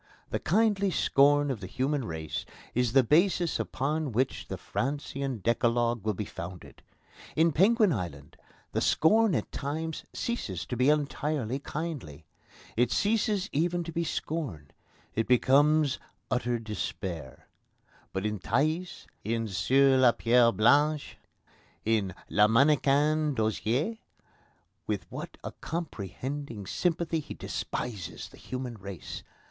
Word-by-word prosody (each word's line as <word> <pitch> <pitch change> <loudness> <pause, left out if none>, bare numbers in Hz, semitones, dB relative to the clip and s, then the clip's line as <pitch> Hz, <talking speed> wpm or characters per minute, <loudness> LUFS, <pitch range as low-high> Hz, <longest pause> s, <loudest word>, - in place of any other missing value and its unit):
The - - 0
kindly 200 0 +2
scorn 145 -3 +4
of 125 - -3
the 95 - -7
human 130 +4 -1
race 80 -5 -4 0.3
is 125 -1 +1
the 135 -1 +6
basis 170 - +3
upon 150 +2 -1
which 130 +4 0
the - - -4
Francian 135 -3 -3
Decalogue 120 -1 +1
will 110 -2 0
be 105 - -3
founded. 90 -1 -9 0.5
In 165 +1 +4
Penguin 205 - +4
Island 75 - -5 0.4
the - - 0
scorn 215 +4 +4
at - - -2
times 155 +3 -3
ceases 105 - -3
to 125 - -4
be 125 +3 +3
entirely 145 -3 0
kindly. 140 - -5 0.5
It 120 +1 +2
ceases 205 -2 +1
even 175 +4 0
to 165 - -6
be 170 +1 -1
scorn. 130 - -4 0.4
It 115 - 0
becomes 140 +3 +4 0.3
utter 125 -1 +1
despair. 95 - -5 0.7
But 95 +2 -3
in 105 -1 -1
Thaïs, 155 - -1 0.2
in 115 +1 -1
Sur 130 +8 +4
la 125 -2 +6
Pierre 120 0 +4
Blanche, 145 +7 +3 0.7
in 105 -5 +1
Le 105 +1 +4
Mannequin 145 +4 +3
d'Osier, 110 - 0 0.9
with - - -2
what - - -7
a - - -4
comprehending 130 - -5
sympathy 170 - 0
he 150 - -8
despises 100 -9 -5
the - - -16
human 125 -3 -6
race! 95 -4 -7
135 Hz, 125 wpm, -29 LUFS, 110-155 Hz, 0.9 s, the